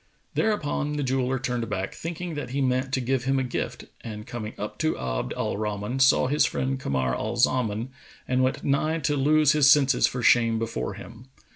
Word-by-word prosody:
Thereupon 150 -8 0
the 150 -1 -2
jeweller 130 0 0
turned 125 -2 -3
back, 95 -1 -3
thinking 170 +1 -5
that 145 -5 -5
he 135 +3 -2
meant 130 0 0
to - - +2
give 125 0 -1
him 135 +1 +2
a 130 - +1
gift, 125 - -4 0.2
and 105 -2 -7
coming 110 -2 -6
up 105 - -6
to 155 0 0
Abd - - -3
al - - -2
Rahman, 105 +4 -3
saw 130 0 +5
his 145 +4 +2
friend 130 0 -1
Kamar 65 - -1
al 120 - -3
Zaman 120 -1 +1 0.4
and 130 0 +1
went 130 +1 0
nigh 155 +3 +1
to 145 -1 0
lose 150 +1 +4
his 145 -2 +5
senses 140 -3 +5
for 125 -1 -4
shame 115 -2 +4
before 110 -3 -3
him. 115 +4 -12
130 Hz, 195 wpm, -26 LUFS, 115-140 Hz, 0.4 s, saw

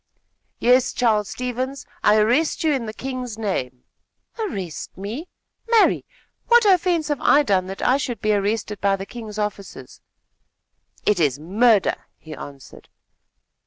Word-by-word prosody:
"Yes, 250 +2 +3
Charles 215 -4 +1
Stevens, 255 +2 -4 0.2
I 210 +1 +5
arrest 245 +12 +2
you 315 -2 +3
in 250 -5 -2
the - - -4
king's 250 -1 -5
name." 130 - -3 0.6
"Arrest 195 - -5
me? 225 - -6 0.4
Marry! 460 -2 +4 0.4
what 475 -1 +6
offence 355 -5 +3
have 295 -3 -1
I 295 +1 +5
done 190 -7 +1
that 195 +1 -6
I 260 - +4
should 245 -4 -4
be 215 0 +1
arrested 210 0 -1
by 195 0 +3
the 195 0 -6
king's 215 -1 -9
officers?" 210 -2 -6 1.0
"It 210 -3 +2
is 145 -5 +2
murder!" 205 +6 +2
he 160 - -11
answered. 140 -2 -11
220 Hz, 140 wpm, -22 LUFS, 195-265 Hz, 1.0 s, what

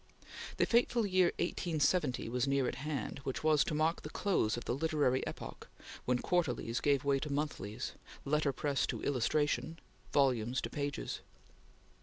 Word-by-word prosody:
The - - +4
fateful 235 -1 +3
year 185 -2 +4
1870 160 -6 +1
was 125 +3 0
near 135 -2 +2
at - - -1
hand, 145 -2 -3
which 135 -2 -4
was 155 -2 +5
to 155 - -2
mark 160 +2 +1
the - - -7
close 175 - +1
of 120 - -6
the - - 0
literary 145 -3 +1
epoch, - - -7 0.4
when 125 0 +2
quarterlies 125 -7 0
gave 140 -2 +2
way 140 -1 +2
to 150 +1 -4
monthlies; 140 -8 -3 0.3
letter 150 0 +2
press 140 +1 0
to - - -4
illustration; 150 +4 +1 0.3
volumes 130 -3 +2
to - - -5
pages. 145 -1 -3
145 Hz, 155 wpm, -34 LUFS, 130-155 Hz, 0.4 s, was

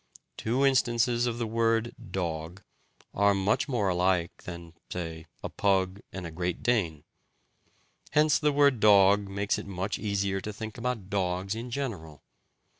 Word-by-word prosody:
Two 125 +5 0
instances 120 -2 +2
of 120 -1 -2
the 120 - -1
word 115 +1 +1 0.2
"dog" 85 0 -4 0.5
are 100 0 +3
much 100 +7 +1
more 115 -8 0
alike 90 -1 +1
than 85 -2 -8 0.2
(say) 80 -2 -5 0.2
a - - -3
pug 95 -1 +1
and 95 -2 -6
a 85 - -6
great 90 +2 -3
dane; 95 -11 0 1.1
hence 150 0 +3
the 150 -1 +2
word 140 -3 +4
"dog" 100 -1 +5
makes 100 +1 -1
it - - -8
much 95 +1 -3
easier 100 -2 -1
to 105 - -5
think 110 +1 -7
about 115 -5 -3
dogs 95 0 -1
in 115 +3 -5
general. 100 - -5
100 Hz, 150 wpm, -28 LUFS, 90-115 Hz, 1.1 s, dog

